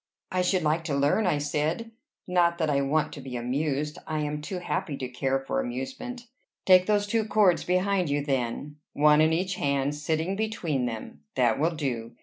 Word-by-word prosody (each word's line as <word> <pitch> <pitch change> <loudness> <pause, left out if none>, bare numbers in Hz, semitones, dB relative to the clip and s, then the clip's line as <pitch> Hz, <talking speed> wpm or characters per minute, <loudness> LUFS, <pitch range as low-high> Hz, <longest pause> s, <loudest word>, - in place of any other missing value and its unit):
"I 185 - +1
should 180 -1 +1
like 155 +2 +1
to 150 -4 -1
learn," 145 +9 +2
I 155 - +2
said, 150 +10 -1 0.4
"not 175 -2 +3
that 160 -3 +1
I 140 -1 +2
want 150 +3 0
to 140 - -8
be 130 -1 -7
amused; 140 +4 -2
I 155 -1 -1
am 150 0 -3
too 180 +5 -5
happy 160 -4 -3
to 130 - -4
care 130 +2 0
for 135 - -2
amusement." 255 -1 -5 0.4
"Take 185 -1 +6
those 205 -1 +2
two 220 +2 +1
cords 205 -4 +3
behind 185 -1 +1
you, 145 0 0
then, 135 +2 -2 0.2
one 150 +1 +5
in 160 +1 +4
each 185 +3 -1
hand, 140 0 0
sitting 160 +5 -1
between 180 - -1
them. 110 -10 -7
That 120 -2 +2
will 165 +3 +1
do. 120 -6 -3
155 Hz, 190 wpm, -27 LUFS, 140-185 Hz, 0.4 s, Take